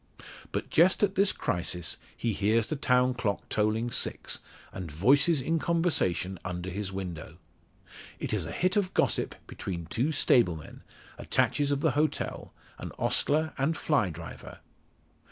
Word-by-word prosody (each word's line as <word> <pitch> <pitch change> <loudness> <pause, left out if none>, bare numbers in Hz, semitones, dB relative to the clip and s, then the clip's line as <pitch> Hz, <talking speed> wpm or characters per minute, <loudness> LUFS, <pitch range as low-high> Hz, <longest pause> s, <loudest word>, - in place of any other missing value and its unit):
But - - -4
just 180 +5 +5
at 195 -2 +3
this 195 0 +4
crisis 90 -1 -2 0.2
he 115 -2 -1
hears 110 +3 +2
the 155 - -3
town 125 -2 +2
clock 110 -5 -2
tolling 110 +3 0
six, - - -1 0.3
and 90 -5 -6
voices 140 - +4
in 165 +5 0
conversation 145 - 0
under 90 0 -4
his 100 +1 -3
window. 85 -4 -6 0.8
It - - -4
is - - -1
a - - -5
hit 185 +2 0
of 195 -3 0
gossip - - +1
between 85 -3 -5
two 120 - 0
stable 120 - +3
men 75 - -11 0.4
attaches 145 -1 +1
of 140 -1 0
the - - +3
hotel 150 +1 -1 0.3
an - - -6
ostler 155 +1 +1
and 155 +4 +1
fly 140 - +1
driver. 80 - -9
120 Hz, 150 wpm, -29 LUFS, 95-155 Hz, 0.8 s, just